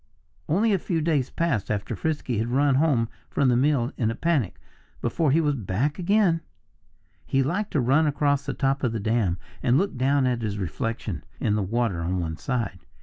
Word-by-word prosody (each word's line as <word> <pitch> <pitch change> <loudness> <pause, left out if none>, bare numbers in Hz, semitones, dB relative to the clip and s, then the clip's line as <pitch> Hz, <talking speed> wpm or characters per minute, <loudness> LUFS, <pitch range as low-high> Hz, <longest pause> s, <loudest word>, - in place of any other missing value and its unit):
Only 205 +7 +3
a 195 - +2
few 170 0 -1
days 150 -5 +1
passed 150 - -1
after 105 -1 -2
Frisky 150 -8 -2
had 115 - 0
run 135 +3 +3
home 135 -5 +2 0.2
from 140 -2 +2
the 120 - +3
mill 130 -1 +2
in 115 -3 +1
a 115 - -2
panic, 145 - 0 0.4
before 145 +6 0
he 150 +5 +4
was 150 -3 +2
back 125 - -1
again. 180 -2 +3 0.8
He 135 0 +1
liked 185 +10 -1
to 150 - +2
run 135 +6 +3
across 145 -1 +1
the - - -2
top 135 0 0
of 120 -3 +1
the 115 - -2
dam 105 -4 +1 0.2
and 125 +2 +3
look 195 0 0
down 135 +1 +2
at 125 -2 0
his 105 -2 -2
reflection 110 +4 -3 0.2
in 105 - +1
the 105 - +1
water 100 -3 0
on 90 +2 -1
one 80 -2 -3
side. 115 - -2
130 Hz, 200 wpm, -25 LUFS, 115-150 Hz, 0.8 s, he